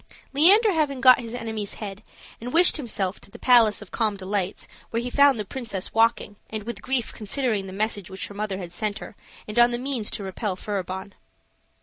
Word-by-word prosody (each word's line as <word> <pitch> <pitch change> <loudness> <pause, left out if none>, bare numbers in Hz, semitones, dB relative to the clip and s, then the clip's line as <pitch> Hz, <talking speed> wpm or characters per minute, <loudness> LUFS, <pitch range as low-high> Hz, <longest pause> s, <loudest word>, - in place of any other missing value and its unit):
Leander 400 +10 +6
having 295 -5 0
got 255 0 +7
his 235 -1 -6
enemy's 220 -4 -4
head, 205 -1 -7 0.4
wished 330 +11 +4
himself 210 -8 -3
in - - -9
the - - -12
Palace 230 -5 +4
of 195 - -18
Calm 215 -3 0
Delights, 195 0 -3 0.2
where 230 - -1
he 245 +1 -4
found 280 -2 +5
the 210 - -2
princess 215 -5 -4
walking, 225 -2 +2
and 215 -1 -5
with 235 +2 -6
grief 260 -3 -1
considering 215 -2 -1
the - - -8
message 205 -1 -2
which 190 0 -5
her - - -11
mother 205 -1 -3
had 180 -3 -7
sent 205 +3 -2
her, - - -10 0.3
and 215 +2 -1
on 240 0 +7
the 240 - -2
means 250 -4 -2
to 205 - -5
repel 190 +1 -3
Furibon. 190 0 -5
215 Hz, 200 wpm, -24 LUFS, 200-245 Hz, 0.4 s, got